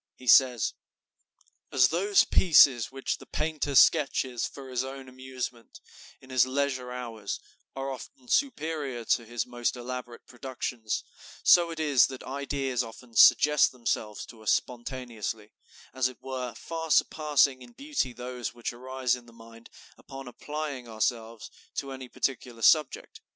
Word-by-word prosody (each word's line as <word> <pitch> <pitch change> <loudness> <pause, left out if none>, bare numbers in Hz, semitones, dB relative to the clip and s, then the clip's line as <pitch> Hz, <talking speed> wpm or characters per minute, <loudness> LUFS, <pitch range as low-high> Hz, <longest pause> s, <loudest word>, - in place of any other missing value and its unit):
He 130 - -15
says: 125 -1 +5 1.0
"As 130 -1 +5
those 195 +5 +3
pieces 135 - +5
which 135 0 -3
the - - -14
painter 150 -2 -2
sketches 135 -5 +4
for 135 -1 -11
his 125 0 0
own 135 0 -8
amusement, 130 -2 -7 0.4
in 130 - -15
his 130 -1 +4
leisure 130 -2 -1
hours, 115 -5 -5 0.4
are 135 0 -3
often 130 -1 -10
superior 155 - -1
to 115 - +1
his 120 0 -2
most 120 0 -2
elaborate 125 -1 -7
productions, 125 -3 -4 0.4
so 175 -1 +6
it 165 -1 -6
is 145 -5 +4
that 130 -1 -9
ideas 135 -2 -2
often 115 +1 -12
suggest 150 +5 +6
themselves 110 -4 -3
to 115 -2 -14
us 110 - +1
spontaneously, 120 -4 -3 0.4
as 130 -1 +1
it 130 - -10
were, 130 -3 -5
far 165 +5 -6
surpassing 145 -3 +3
in 120 -1 -13
beauty 285 - -2
those 125 0 -6
which 120 0 -4
arise 130 0 -1
in 120 -1 -13
the - - -15
mind 115 0 -15 0.3
upon 135 -1 -10
applying 145 0 -6
ourselves 115 0 -3 0.2
to 140 -1 -4
any 130 -1 -8
particular 120 -3 -3
subject. 155 +1 +2
130 Hz, 145 wpm, -28 LUFS, 120-135 Hz, 1.0 s, so